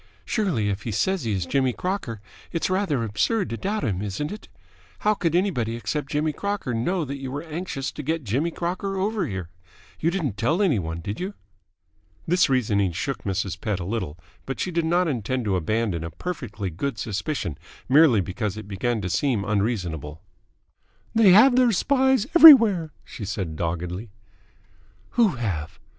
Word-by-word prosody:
Surely, 175 - 0
if 100 0 -2
he 115 - -5
says 185 - 0
he 110 - 0
is 95 -3 -1
Jimmy 130 +3 +1
Crocker, 180 - -3 0.3
it's 165 +2 -1
rather 185 - 0
absurd 145 - 0
to - - -1
doubt 205 - -2
him, 95 -3 -1
isn't 105 +9 -3
it? 210 - -8 0.5
How 215 - +3
could 170 -5 -1
anybody 140 - 0
except 135 +4 -3
Jimmy 150 +1 0
Crocker 200 -10 -3
know 160 +9 0
that 140 +1 -5
you 135 -1 -5
were 145 +3 -4
anxious 155 -4 -4
to - - -7
get 160 +2 -2
Jimmy 130 +10 0
Crocker 185 +3 -3
over 205 +2 0
here? 95 -4 -5 0.5
You 165 - +2
didn't 160 - -2
tell 125 - +1
any 175 - +3
one, 80 -1 -4
did 100 +6 -5
you?" 195 +3 -4 0.9
This 180 -1 +3
reasoning 105 -8 +1
shook 135 - -3
Mrs. 95 -1 -2
Pett 105 -4 -1
a 85 - -4
little, 95 -7 -3 0.3
but 135 - -4
she 185 - -1
did 170 -1 0
not 175 +2 +2
intend 125 -2 -2
to 100 -2 +1
abandon 95 0 -1
a 85 - -4
perfectly 105 - -5
good 110 - -3
suspicion 110 - -3 0.3
merely 135 -5 +6
because 100 +3 -3
it 110 -2 -8
began 110 +3 -1
to 95 - -3
seem 105 - 0
unreasonable. 90 - -2 0.9
"They 225 -3 +6
have 230 +8 +7
their 250 -2 +5
spies 265 +1 +2
everywhere," 225 - +9
she 110 - -8
said 95 -5 -4
doggedly. 90 +6 -3 1.0
"Who 220 - +3
have?" 85 -9 -4
130 Hz, 175 wpm, -24 LUFS, -, 1.0 s, everywhere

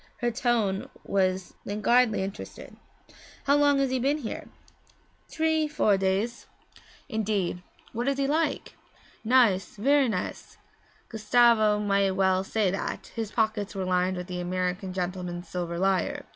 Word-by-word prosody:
Her 240 -1 0
tone 225 -5 0
was 185 -1 0
languidly 220 +1 +2
interested. 195 +1 -8 0.7
'How 280 - +3
long 290 -1 +4
has 275 -1 +1
he 260 - 0
been 280 +4 +1
here?' 255 -7 -6 0.8
'Tree 315 -1 +1
four 295 -9 +2
days.' 195 +5 -1 0.6
'Indeed 210 -7 -1 0.3
what 240 +3 -2
is 275 -1 +1
he 275 - +1
like?' 310 +4 -1 0.5
'Nice 220 -6 +3
ver' 275 +6 +3
nice.' 195 -5 -4 0.5
(Gustavo 220 -1 +3
might 200 -2 +1
well 190 -1 +2
say 200 -1 0
that; 195 - -4
his 225 -3 -3
pockets 215 -2 -1
were 190 -1 -2
lined 185 0 +1
with 180 - -5
the 180 -1 -5
American 180 +1 -2
gentleman's 180 -1 -4
silver 170 -1 -4
lire.) 190 +1 0
210 Hz, 135 wpm, -27 LUFS, 185-245 Hz, 0.8 s, long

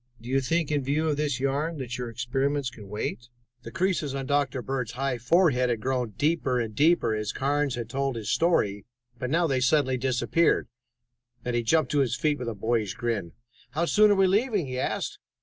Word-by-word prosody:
Do 120 +2 -10
you 135 +1 +2
think, 160 +4 0
in 145 -1 +1
view 150 +4 0
of 145 - 0
this 145 -4 -1
yarn, 145 +5 -1
that 125 -3 -5
your 125 -1 -4
experiments 130 +3 -1
can 105 -5 -12
wait?" 105 +3 -4 0.3
The - - -8
creases 170 -5 -1
on 135 -1 -3
Dr. 140 -2 0
Bird's 130 -4 -3
high 130 -1 -2
forehead 125 -1 +3
had 120 -2 0
grown 125 -3 -2
deeper 145 -5 +1
and 115 -2 -3
deeper 145 -3 +3
as 105 -1 -2
Carnes 145 0 0
had 120 -2 -4
told 135 +2 -2
his 110 -2 -3
story, 105 - +1 0.4
but 125 - -3
now 170 +4 +2
they 135 -5 +1
suddenly 130 0 +2
disappeared, 130 +6 +1 0.8
and 125 -1 -1
he 120 - +2
jumped 155 +8 +2
to 145 - +2
his 125 -4 +1
feet 145 +3 0
with 125 -2 -3
a 115 - -5
boyish 110 -1 -1
grin. 115 -9 -2 0.4
"How 165 +4 +1
soon 210 +4 +5
are 205 - +5
we 195 0 +4
leaving?" 205 - +2
he 130 -1 -4
asked. - - -2
130 Hz, 205 wpm, -27 LUFS, 120-150 Hz, 0.8 s, soon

